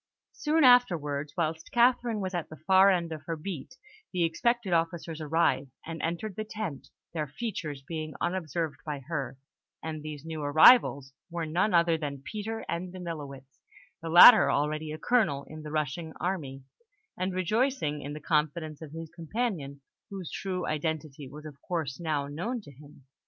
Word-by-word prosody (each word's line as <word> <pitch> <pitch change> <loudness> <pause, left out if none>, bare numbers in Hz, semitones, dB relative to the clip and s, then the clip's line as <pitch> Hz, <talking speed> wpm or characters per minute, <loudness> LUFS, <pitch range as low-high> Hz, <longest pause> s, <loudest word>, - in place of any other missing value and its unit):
Soon 315 +1 +1
afterwards, 160 - +4
whilst 160 -1 -2
Catherine 240 -2 +3
was 190 0 -3
at 175 -3 -3
the 155 - -9
far 190 +5 +5
end 175 -3 +1
of 155 -1 -5
her 165 - -2
beat, 160 - -7 0.4
the 180 -2 0
expected 205 +4 0
officers 165 -1 -1
arrived, 145 -3 +1 0.2
and 165 0 -6
entered 175 +5 -3
the 215 - -3
tent, 210 -9 -6 0.3
their 155 -3 -2
features 160 - -5
being 155 -2 -5
unobserved 165 -4 -2
by 145 -3 -4
her; 135 -3 -4 0.5
and 155 -1 -4
these 150 -1 -7
new 160 -1 -5
arrivals 145 - +6 0.2
were 170 -1 -3
none 175 +5 +1
other 170 -1 +3
than 140 -3 -5
Peter 220 +4 -5
and 175 +2 -3
Danilowitz, 145 -7 -8 0.4
the 165 - -5
latter 175 +9 +10
already 155 +1 0
a 155 - -5
colonel 155 - +1
in 155 0 -9
the 150 - -7
Russian 155 +1 -3
army, 145 -8 -3 0.5
and 185 +1 -2
rejoicing 185 - 0
in 145 +1 -6
the 150 - -6
confidence 155 0 -1
of 155 -2 -9
his 165 -1 -7
companion, 165 - -3 0.3
whose 190 -4 -7
true 185 -2 -3
identity 155 -2 -3
was 150 +3 -11
of 145 -2 -10
course 160 -6 -3
now 155 -4 -1
known 175 - -3
to 165 - -13
him. 145 0 -17
160 Hz, 165 wpm, -29 LUFS, 150-185 Hz, 0.5 s, latter